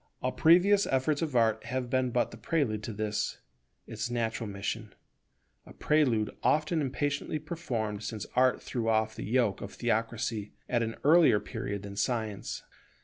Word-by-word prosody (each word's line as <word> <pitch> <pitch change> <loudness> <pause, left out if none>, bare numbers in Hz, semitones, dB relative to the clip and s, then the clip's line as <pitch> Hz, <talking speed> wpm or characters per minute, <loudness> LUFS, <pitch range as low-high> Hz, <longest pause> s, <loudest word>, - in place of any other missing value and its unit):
All 130 - +1
previous 185 +7 +5
efforts 140 +3 +1
of 155 -5 -2
Art 110 -2 +2
have 125 +1 -2
been 130 -1 +2
but 120 0 0
the 115 - -10
prelude 115 -3 0
to - - -4
this, 105 0 -2 0.5
its - - -4
natural 115 -2 -2
mission; 100 +2 -4 0.7
a - - -14
prelude 125 -9 +1
often 155 +2 +2
impatiently 145 +2 -1
performed 125 - -3
since 110 -2 -5
Art 130 0 +3
threw 115 -2 -2
off 110 0 +2
the - - -6
yoke 115 -3 +1
of 100 - -7
theocracy 115 -2 -1
at 120 -2 +1
an 115 0 -2
earlier 155 -7 +6
period 100 -1 -5
than 100 0 -7
Science. 110 -1 -2
120 Hz, 155 wpm, -30 LUFS, 110-140 Hz, 0.7 s, earlier